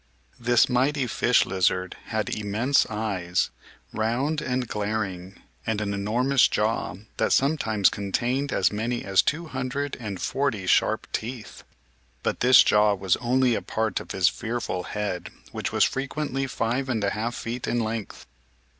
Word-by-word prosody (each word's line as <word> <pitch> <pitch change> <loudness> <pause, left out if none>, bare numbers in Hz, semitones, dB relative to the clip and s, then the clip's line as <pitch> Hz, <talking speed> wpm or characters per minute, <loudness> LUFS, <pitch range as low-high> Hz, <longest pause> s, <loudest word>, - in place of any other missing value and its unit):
This 120 0 +4
mighty 135 +2 +1
Fish 120 +1 +3
Lizard 95 -1 0
had - - -2
immense 110 +6 +1
eyes, 100 -5 -1 0.4
round 130 +8 0
and 125 -1 -1
glaring, 100 -3 -3 0.2
and 110 -2 -1
an 100 -1 -2
enormous 120 +7 +3
jaw 110 -2 -1 0.2
that - - +1
sometimes 120 -8 +3
contained 120 +7 -1
as 95 - +2
many 115 +3 -2
as 95 -1 +4
two 165 +4 -1
hundred 135 0 -3
and 100 -6 -5
forty 130 -8 -1
sharp - - +2
teeth. 115 0 -5 0.6
But - - -1
this 125 0 +7
jaw 105 0 +4
was 95 -2 +1
only 125 0 +2
a - - -1
part 110 0 -1
of - - -11
his 95 -3 +2
fearful 115 -6 -2
head 100 -4 -3 0.2
which - - -3
was - - +3
frequently 135 0 -1
five 125 +2 -1
and 110 -4 0
a 100 - +1
half 115 +2 -2
feet 120 +2 -4
in 120 - 0
length. 110 -2 -4
115 Hz, 150 wpm, -25 LUFS, 105-130 Hz, 0.6 s, this